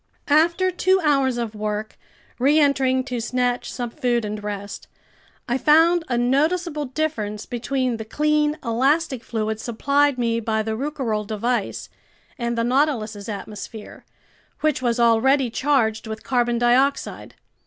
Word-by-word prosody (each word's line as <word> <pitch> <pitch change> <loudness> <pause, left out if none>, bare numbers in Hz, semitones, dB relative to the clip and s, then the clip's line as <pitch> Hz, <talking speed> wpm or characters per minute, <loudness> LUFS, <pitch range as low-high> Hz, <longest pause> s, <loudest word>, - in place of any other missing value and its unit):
After 340 +5 +3
two 375 +1 +2
hours 275 -4 +2
of 230 -2 -3
work, 210 0 -4 0.4
reentering 270 -2 +3
to 250 -2 -4
snatch 245 +1 -1
some 245 -2 -4
food 240 -5 0
and 210 0 -5
rest, 205 -1 -6 0.6
I 245 +2 0
found 325 +5 +4
a 240 - 0
noticeable 300 +5 +1
difference 250 -7 -3
between 250 0 -2
the 220 - -5
clean 300 +4 +1
elastic 265 +3 +1
fluid 220 -1 -3
supplied 280 +5 +1
me 230 -1 0
by 220 -1 -1
the 220 0 -2
Rouquayrol 235 -6 -2
device 220 0 -2 0.5
and 235 0 -2
the 230 - +1
Nautilus's 230 -6 0
atmosphere, 210 +1 -8 0.6
which 305 -4 +1
was 240 -2 0
already 240 +3 +3
charged 235 -5 +1
with 220 0 -6
carbon 240 -2 +1
dioxide. 250 +4 +1
245 Hz, 135 wpm, -22 LUFS, 225-285 Hz, 0.6 s, found